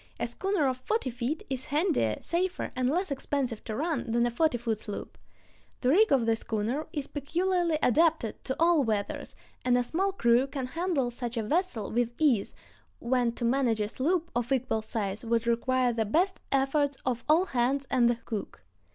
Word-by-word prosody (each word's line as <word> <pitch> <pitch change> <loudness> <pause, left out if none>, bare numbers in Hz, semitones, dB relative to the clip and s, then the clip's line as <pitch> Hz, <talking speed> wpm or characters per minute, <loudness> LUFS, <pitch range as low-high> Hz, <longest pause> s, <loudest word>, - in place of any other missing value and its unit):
A - - 0
schooner 385 -7 0
of 255 -1 -1
forty 265 - -1
feet 250 +6 -3
is 260 -1 -4
handier, 290 - +1
safer, 360 +2 -2
and 255 0 +1
less 350 +3 0
expensive 270 -4 -2
to 215 - -4
run 280 -4 -2
than 235 +1 +2
a 240 - 0
forty 280 +1 +2
foot 225 -2 -2
sloop. 205 -2 -7 0.7
The 250 - +2
rig 425 +7 +5
of 260 -4 +4
the 225 0 +3
schooner 225 +7 -2
is 290 -3 -3
peculiarly 340 +4 0
adapted 310 -3 +2
to 265 - -2
all 330 -3 +4
weathers, 215 -4 -2 0.3
and 250 -1 +3
a 245 - +2
small 380 +10 0
crew 245 -7 +3
can 270 -2 -4
handle 305 -3 -1
such 240 0 -5
a 225 - 0
vessel 295 - -1
with 240 +1 0
ease, 265 -10 +2 0.4
when 240 -1 +1
to 235 - -3
manage 240 -2 +2
a 210 - 0
sloop 335 - -1
of 240 +2 -1
equal 255 -4 +1
size 215 -2 -3
would 230 0 0
require 245 +1 +2
the 225 -1 +1
best 355 - +1
efforts 275 +1 +1
of 245 -2 -1
"all 330 +4 +5
hands 270 0 0
and 245 -3 +4
the 240 - +2
cook." 220 - -6
255 Hz, 185 wpm, -29 LUFS, 235-310 Hz, 0.7 s, rig